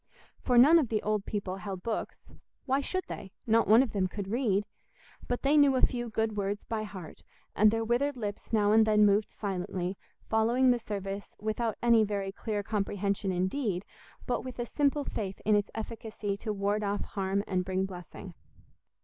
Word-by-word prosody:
For 245 Hz, -, +1 dB
none 300 Hz, +8 st, +8 dB
of 270 Hz, -8 st, 0 dB
the 215 Hz, -2 st, -1 dB
old 210 Hz, -1 st, 0 dB
people 195 Hz, -3 st, -3 dB
held 190 Hz, -1 st, -6 dB
books—why 260 Hz, +4 st, -4 dB
should 370 Hz, +6 st, -2 dB
they? 190 Hz, -, -8 dB
Not 230 Hz, 0 st, +3 dB
one 225 Hz, +5 st, +7 dB
of 260 Hz, -, -4 dB
them 190 Hz, -3 st, 0 dB
could 195 Hz, +1 st, -6 dB
read. 215 Hz, -4 st, +1 dB, 0.6 s
But 245 Hz, -, -2 dB
they 280 Hz, +2 st, +3 dB
knew 285 Hz, -2 st, +6 dB
a 255 Hz, -, +2 dB
few 240 Hz, -1 st, +1 dB
"good 220 Hz, -1 st, -1 dB
words" 205 Hz, 0 st, -2 dB
by 225 Hz, -1 st, -3 dB
heart, 190 Hz, -6 st, -8 dB, 0.3 s
and 215 Hz, +1 st, +6 dB
their 225 Hz, +1 st, 0 dB
withered 260 Hz, +4 st, +1 dB
lips 205 Hz, -3 st, -5 dB
now 210 Hz, -2 st, +3 dB
and 220 Hz, +1 st, +6 dB
then 210 Hz, -1 st, +5 dB
moved 205 Hz, +1 st, +3 dB
silently, 185 Hz, -2 st, -4 dB, 0.3 s
following 235 Hz, +4 st, +3 dB
the 245 Hz, -, +1 dB
service 200 Hz, -2 st, -5 dB
without 220 Hz, +1 st, -2 dB
any 235 Hz, -2 st, +5 dB
very 200 Hz, -2 st, -2 dB
clear 205 Hz, 0 st, -3 dB
comprehension 200 Hz, -1 st, -1 dB
indeed, 185 Hz, +1 st, -1 dB, 0.4 s
but 250 Hz, -, -1 dB
with 255 Hz, -1 st, -7 dB
a 240 Hz, -, -2 dB
simple 285 Hz, +3 st, +1 dB
faith 195 Hz, -7 st, -4 dB
in 210 Hz, 0 st, +4 dB
its 205 Hz, -1 st, +1 dB
efficacy 220 Hz, -2 st, -4 dB
to 215 Hz, -, -4 dB
ward 205 Hz, +1 st, 0 dB
off 205 Hz, 0 st, -1 dB
harm 195 Hz, 0 st, -2 dB
and 185 Hz, -2 st, 0 dB
bring 190 Hz, +1 st, -1 dB
blessing. 180 Hz, -3 st, -9 dB
210 Hz, 185 wpm, -30 LUFS, 195-235 Hz, 0.6 s, none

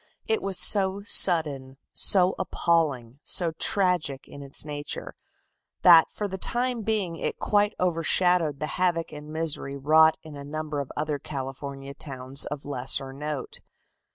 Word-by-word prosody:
It 445 Hz, -2 st, 0 dB
was 195 Hz, -2 st, -3 dB
so 195 Hz, -1 st, +3 dB
sudden, 145 Hz, -10 st, +2 dB, 0.2 s
so 185 Hz, -1 st, +4 dB
appalling, 140 Hz, -7 st, 0 dB
so 170 Hz, 0 st, -1 dB
tragic 170 Hz, -6 st, 0 dB
in 140 Hz, -, -11 dB
its 140 Hz, +1 st, -2 dB
nature, 145 Hz, -1 st, -5 dB, 0.7 s
that 170 Hz, -3 st, +8 dB
for 210 Hz, -, -4 dB
the 190 Hz, -1 st, -6 dB
time 245 Hz, +2 st, 0 dB
being 205 Hz, -6 st, -1 dB
it -, -, -2 dB
quite 205 Hz, 0 st, +1 dB
overshadowed 170 Hz, -3 st, +1 dB
the 155 Hz, -, -2 dB, 0.2 s
havoc 170 Hz, -2 st, +1 dB
and 150 Hz, 0 st, -10 dB
misery 155 Hz, -3 st, -2 dB
wrought 155 Hz, +3 st, +5 dB
in 155 Hz, -2 st, -10 dB
a 140 Hz, -, -8 dB
number 150 Hz, 0 st, -4 dB
of 140 Hz, -, -5 dB
other 150 Hz, -1 st, -2 dB
California 135 Hz, 0 st, -7 dB
towns 135 Hz, -1 st, -6 dB
of 145 Hz, -1 st, -6 dB
lesser 135 Hz, 0 st, -2 dB
note. 150 Hz, -1 st, -5 dB
155 Hz, 145 wpm, -26 LUFS, 140-180 Hz, 0.7 s, that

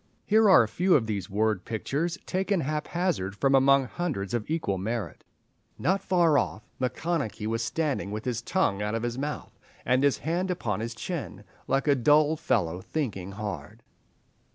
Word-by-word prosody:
Here 215 Hz, 0 st, +5 dB
are 185 Hz, -, +8 dB
a -, -, -2 dB
few 180 Hz, -, +2 dB
of 125 Hz, -6 st, +3 dB
these 105 Hz, -2 st, -3 dB
word 105 Hz, -1 st, 0 dB
pictures, 150 Hz, -, -2 dB
taken 190 Hz, 0 st, 0 dB
haphazard 150 Hz, -, -1 dB
from 135 Hz, +6 st, +2 dB
among 135 Hz, 0 st, +5 dB
hundreds 130 Hz, -, -3 dB
of 120 Hz, 0 st, -2 dB
equal 125 Hz, -, -1 dB
merit— 110 Hz, -1 st, -4 dB, 0.5 s
"Not 190 Hz, +2 st, +1 dB
far 170 Hz, -6 st, +3 dB
off 110 Hz, -, -3 dB, 0.2 s
Macconochie 130 Hz, -4 st, -2 dB
was 115 Hz, +1 st, -1 dB
standing 140 Hz, -1 st, -1 dB
with 105 Hz, +3 st, -5 dB
his 120 Hz, -3 st, -1 dB
tongue 115 Hz, -, 0 dB
out 105 Hz, +1 st, -1 dB
of 115 Hz, -, -2 dB
his 120 Hz, +1 st, -2 dB
mouth, 150 Hz, +1 st, -5 dB, 0.3 s
and 130 Hz, +2 st, +3 dB
his 140 Hz, -2 st, +3 dB
hand 175 Hz, +4 st, -1 dB
upon 110 Hz, -, -2 dB
his 115 Hz, +1 st, -4 dB
chin, 135 Hz, -, -5 dB, 0.2 s
like 135 Hz, +2 st, +1 dB
a 145 Hz, -, +6 dB
dull 150 Hz, +4 st, +4 dB
fellow 90 Hz, -, 0 dB
thinking 100 Hz, -, -4 dB
hard. 105 Hz, 0 st, -6 dB
130 Hz, 170 wpm, -27 LUFS, 110-160 Hz, 0.5 s, are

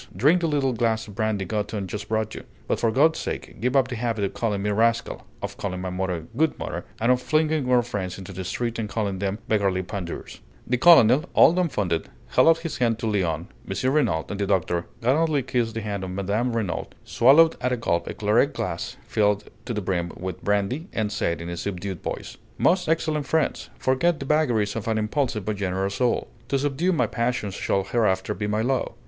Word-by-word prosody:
Drink 150 Hz, -, +4 dB
the 165 Hz, -, +1 dB
little 140 Hz, -4 st, +1 dB
glass 115 Hz, -1 st, 0 dB
of 100 Hz, -, -10 dB
brandy 105 Hz, -1 st, -1 dB
Gothon 105 Hz, +1 st, -2 dB
just 105 Hz, +3 st, -6 dB
brought 110 Hz, 0 st, -1 dB
you; -, -, -7 dB, 0.2 s
but -, -, 0 dB
for 115 Hz, -, +2 dB
God's 155 Hz, +7 st, +3 dB
sake -, -, -5 dB
give 125 Hz, +3 st, 0 dB
up 135 Hz, -2 st, +4 dB
the 130 Hz, -, -4 dB
habit 115 Hz, -3 st, -1 dB
of 100 Hz, 0 st, -1 dB
calling 100 Hz, -1 st, -1 dB
me 105 Hz, -, 0 dB
rascal, 115 Hz, +2 st, 0 dB, 0.2 s
of -, -, -4 dB
calling 90 Hz, -2 st, -3 dB
my 90 Hz, 0 st, -4 dB
mother 90 Hz, -2 st, -2 dB
'Good 160 Hz, +4 st, +1 dB
Mother,' -, -, -5 dB
and 115 Hz, +3 st, +3 dB
of 125 Hz, 0 st, +2 dB
flinging 155 Hz, -2 st, +1 dB
our 125 Hz, -1 st, +5 dB
friends 95 Hz, -6 st, -4 dB
into 95 Hz, 0 st, -9 dB
the 95 Hz, +1 st, -5 dB
street 115 Hz, +5 st, -3 dB
and 110 Hz, -2 st, -3 dB
calling 100 Hz, -2 st, -2 dB
them 100 Hz, +1 st, -1 dB
beggarly 100 Hz, -3 st, +1 dB
pandours!" 90 Hz, -3 st, -6 dB, 0.3 s
The 125 Hz, -, +1 dB
colonel, 150 Hz, -3 st, +7 dB
all -, -, +7 dB
dumbfounded, 105 Hz, -, 0 dB, 0.2 s
held -, -, +4 dB
out 165 Hz, 0 st, +6 dB
his 165 Hz, -, -4 dB
hand 115 Hz, -3 st, +2 dB
to 115 Hz, -, -5 dB
Léon, 90 Hz, -7 st, 0 dB, 0.2 s
M. 130 Hz, +1 st, 0 dB
Renault, 110 Hz, -, +2 dB
and 105 Hz, -, -4 dB
the 100 Hz, -, 0 dB
doctor, 90 Hz, -3 st, 0 dB, 0.2 s
gallantly 145 Hz, +3 st, +2 dB
kissed 120 Hz, -3 st, -1 dB
the 115 Hz, -, -2 dB
hand 100 Hz, -2 st, -3 dB
of 95 Hz, -, -4 dB
Mme. 100 Hz, +6 st, -1 dB
Renault, 110 Hz, -7 st, -2 dB, 0.2 s
swallowed 155 Hz, +7 st, +5 dB
at 125 Hz, 0 st, 0 dB
a 125 Hz, -, +1 dB
gulp 85 Hz, -7 st, -1 dB
a -, -, -5 dB
claret 110 Hz, +7 st, +2 dB
glass 85 Hz, -2 st, -4 dB
filled 105 Hz, -1 st, +1 dB
to 120 Hz, -, -3 dB
the 105 Hz, -, -1 dB
brim 90 Hz, -3 st, -1 dB
with 95 Hz, 0 st, -6 dB
brandy, 105 Hz, -, 0 dB
and 105 Hz, -2 st, -1 dB
said, 85 Hz, -5 st, -1 dB
in 85 Hz, -, -6 dB
a 85 Hz, -, -4 dB
subdued 95 Hz, -1 st, -4 dB
voice: -, -, -5 dB, 0.2 s
"Most 180 Hz, -2 st, +2 dB
excellent 155 Hz, -3 st, 0 dB
friends, 160 Hz, -1 st, 0 dB
forget 150 Hz, +5 st, +1 dB
the 135 Hz, -, -5 dB
vagaries 120 Hz, -9 st, +1 dB
of 115 Hz, 0 st, -4 dB
an 110 Hz, -1 st, +1 dB
impulsive 110 Hz, -1 st, -1 dB
but 110 Hz, -1 st, -2 dB
generous 95 Hz, 0 st, -1 dB
soul. 125 Hz, +3 st, 0 dB, 0.2 s
To 140 Hz, -, +1 dB
subdue 145 Hz, +6 st, 0 dB
my 170 Hz, -, +2 dB
passions 115 Hz, -4 st, -1 dB
shall 95 Hz, +1 st, 0 dB
hereafter 95 Hz, -3 st, +1 dB
be 105 Hz, +3 st, -3 dB
my 105 Hz, +1 st, 0 dB
law. 130 Hz, -1 st, -1 dB
110 Hz, 215 wpm, -24 LUFS, 100-130 Hz, 0.3 s, colonel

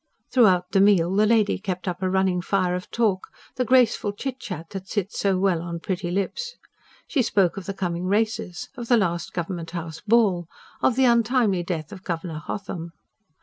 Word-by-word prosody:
Throughout 185 Hz, -8 st, +4 dB
the 195 Hz, -, +4 dB
meal, 190 Hz, -3 st, +4 dB
the 210 Hz, +1 st, +4 dB
lady 220 Hz, -2 st, +3 dB
kept 185 Hz, -2 st, -4 dB
up 180 Hz, 0 st, -3 dB
a 185 Hz, -, +1 dB
running 190 Hz, -1 st, +1 dB
fire 185 Hz, -1 st, +1 dB
of 180 Hz, 0 st, -4 dB
talk 210 Hz, -5 st, 0 dB, 0.3 s
the 255 Hz, -, +1 dB
graceful 250 Hz, -4 st, +3 dB
chitchat 210 Hz, -8 st, -6 dB
that 195 Hz, -1 st, -6 dB
sits 205 Hz, -1 st, -3 dB
so 195 Hz, -2 st, +2 dB
well 185 Hz, -3 st, +2 dB
on 170 Hz, 0 st, -5 dB
pretty 180 Hz, 0 st, -3 dB
lips. 465 Hz, -, -2 dB, 0.5 s
She 285 Hz, -, +1 dB
spoke 195 Hz, -6 st, +2 dB
of 195 Hz, -3 st, -7 dB
the 195 Hz, -, -3 dB
coming 175 Hz, -2 st, -2 dB
Races; 210 Hz, -3 st, -1 dB
of 240 Hz, -3 st, -6 dB
the 240 Hz, -, +5 dB
last 175 Hz, -5 st, -1 dB
Government 170 Hz, -1 st, -4 dB
House 165 Hz, -2 st, -6 dB
Ball; 205 Hz, -6 st, +3 dB, 0.3 s
of 245 Hz, -, +3 dB
the 265 Hz, 0 st, +4 dB
untimely 235 Hz, -5 st, +3 dB
death 170 Hz, -1 st, -4 dB
of 190 Hz, -2 st, -10 dB
Governor 165 Hz, -3 st, -4 dB
Hotham. 170 Hz, 0 st, -6 dB
190 Hz, 185 wpm, -24 LUFS, 175-220 Hz, 0.5 s, the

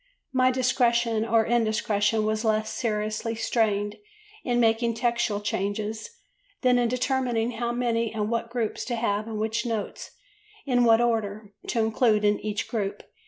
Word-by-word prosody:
My 255 Hz, 0 st, +4 dB
"discretion 240 Hz, -3 st, +2 dB
or 225 Hz, -1 st, +3 dB
indiscretion" 215 Hz, -2 st, +1 dB
was 215 Hz, +1 st, 0 dB
less 215 Hz, -1 st, +1 dB
seriously 215 Hz, 0 st, -2 dB
strained 210 Hz, -2 st, 0 dB, 0.5 s
in 245 Hz, -1 st, +1 dB
making 230 Hz, 0 st, +2 dB
textual 235 Hz, -3 st, 0 dB
changes 210 Hz, +2 st, -3 dB, 0.5 s
than 250 Hz, -1 st, +4 dB
in 240 Hz, -, +2 dB
determining 250 Hz, -2 st, 0 dB
how 235 Hz, 0 st, -2 dB
many, 235 Hz, -2 st, 0 dB
and 210 Hz, -2 st, -2 dB
what, 230 Hz, 0 st, -2 dB
groups 235 Hz, -3 st, -2 dB
to 245 Hz, -, -2 dB
have 215 Hz, -2 st, -1 dB
and 220 Hz, -1 st, -4 dB
which 220 Hz, +1 st, -1 dB
notes, 225 Hz, -4 st, -4 dB, 0.6 s
in 245 Hz, -3 st, +3 dB
what 225 Hz, 0 st, +5 dB
order, 215 Hz, -3 st, -1 dB
to 230 Hz, -, 0 dB
include 220 Hz, -1 st, +2 dB
in 205 Hz, 0 st, +3 dB
each 210 Hz, -1 st, -3 dB
group. 205 Hz, -4 st, -3 dB
225 Hz, 150 wpm, -26 LUFS, 215-240 Hz, 0.6 s, what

